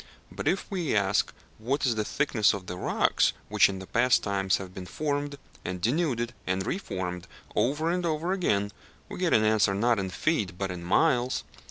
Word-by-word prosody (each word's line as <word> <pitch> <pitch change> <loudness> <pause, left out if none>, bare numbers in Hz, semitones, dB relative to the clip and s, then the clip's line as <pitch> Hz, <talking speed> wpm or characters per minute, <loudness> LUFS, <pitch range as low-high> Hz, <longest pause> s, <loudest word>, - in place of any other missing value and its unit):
But - - -5
if 195 - +1
we 175 - -1
ask 100 -1 +2 0.3
what 135 +7 0
is 125 - +3
the 110 -1 -1
thickness 110 -4 +2
of 95 -2 -7
the 90 - -5
rocks 90 - +2 0.2
which - - +5
in 95 -1 -5
past 125 +5 +3
times 95 -2 +1
have 95 -2 -8
been 95 -1 -7
formed, 145 - -2 0.3
and 90 0 -4
denuded, 120 - 0
and 95 +1 0
re 185 - -1
formed, 90 - -5 0.3
over 150 +6 +1
and 180 0 -1
over 165 +1 -1
again, 100 - +1 0.4
we - - -7
get 180 -2 +1
an 110 - +5
answer, 105 -2 +3
not 115 +2 +2
in 95 -1 -2
feet, 100 - -1
but 95 -1 -2
in 90 -1 -6
miles. 125 - +2
110 Hz, 190 wpm, -28 LUFS, 95-145 Hz, 0.4 s, which